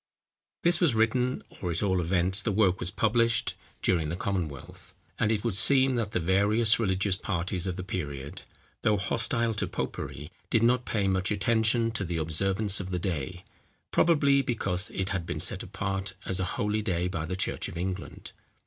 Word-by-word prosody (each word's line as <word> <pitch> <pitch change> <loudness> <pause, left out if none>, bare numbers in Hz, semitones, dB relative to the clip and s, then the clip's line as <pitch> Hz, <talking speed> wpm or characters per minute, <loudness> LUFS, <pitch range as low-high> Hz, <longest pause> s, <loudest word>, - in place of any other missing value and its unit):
] - - -64
This 175 +1 +4
was 160 -10 +3
written, 125 +3 +1 0.2
or, 90 - -2
at 85 +4 -1
all 95 -3 +1
events, 90 +3 +1
the 105 - -1
work 95 -2 +2
was 85 - -1
published, 115 +3 +2 0.3
during 80 -5 +1
the 85 - -2
Commonwealth; 85 -8 -5 0.2
and 105 - +2
it 105 -2 0
would 115 -3 0
seem 135 +6 +5
that 115 -4 -1
the 105 - -1
various 100 +6 +4
religious 95 -2 +1
parties 90 -1 -2
of 90 - -2
the 90 - -5
period, 70 -7 -5 0.4
though 105 -1 +2
hostile 115 +3 0
to 105 - -2
popery, 75 +2 -5 0.2
did 115 - +2
not 125 +1 +3
pay 100 -3 0
much 95 -1 +1
attention 110 +3 +2
to 110 -2 -3
the 85 -2 -3
observance 95 +6 +1
of 95 -1 -5
the 90 - -2
day, 90 -1 -4 0.5
probably 140 -5 +4
because 95 -7 -1
it 95 0 -3
had 90 -3 -3
been 75 - -3
set 90 +2 +2
apart 95 0 -4
as 95 - -3
a 95 - 0
holy 105 -2 0
day 90 -4 -1
by 90 -4 -3
the 90 - -3
church 95 - -1
of - - -8
England. 95 +1 -5
95 Hz, 185 wpm, -28 LUFS, 90-110 Hz, 0.5 s, seem